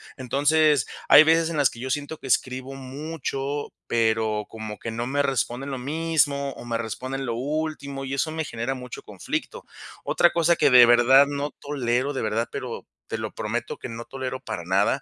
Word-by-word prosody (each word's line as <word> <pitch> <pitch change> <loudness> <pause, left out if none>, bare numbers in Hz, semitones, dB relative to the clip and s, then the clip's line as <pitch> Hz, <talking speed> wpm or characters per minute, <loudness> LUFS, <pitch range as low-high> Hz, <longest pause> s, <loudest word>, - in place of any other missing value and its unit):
Entonces, 145 +3 +2 0.2
hay 150 - +10
veces 165 +1 +3
en 160 - -3
las 140 -3 +4
que 115 - -12
yo 130 +2 -4
siento 145 +3 -3
que 135 - -9
escribo 130 +1 -1
mucho, 140 +1 -4
pero 110 -2 +1
como 110 -2 -7
que 115 - -5
no 115 +2 -3
me 145 +2 +1
responden 135 0 -1
lo 130 - -4
mismo, 145 -1 0
o - - -10
me 115 -1 -1
responden 130 +4 -4
lo 120 - -2
último, 140 0 -3
y 135 - -4
eso 140 +3 0
me 160 -1 -3
genera 120 +3 -3
mucho 125 -1 -8
conflicto. - - -5 0.4
Otra 175 - +3
cosa 170 0 +3
que - - +4
de 125 -1 +9
verdad 120 +3 +6
no 145 0 -3
tolero, 135 -1 -1
de 130 - -3
verdad, 110 +2 -1
pero - - -6 0.2
te - - -3
lo - - -5
prometo - - -3
que - - -7
no 115 +1 -7
tolero 130 -1 -5
para 85 -8 -6
nada, 100 +9 +2
135 Hz, 190 wpm, -24 LUFS, 120-145 Hz, 0.4 s, hay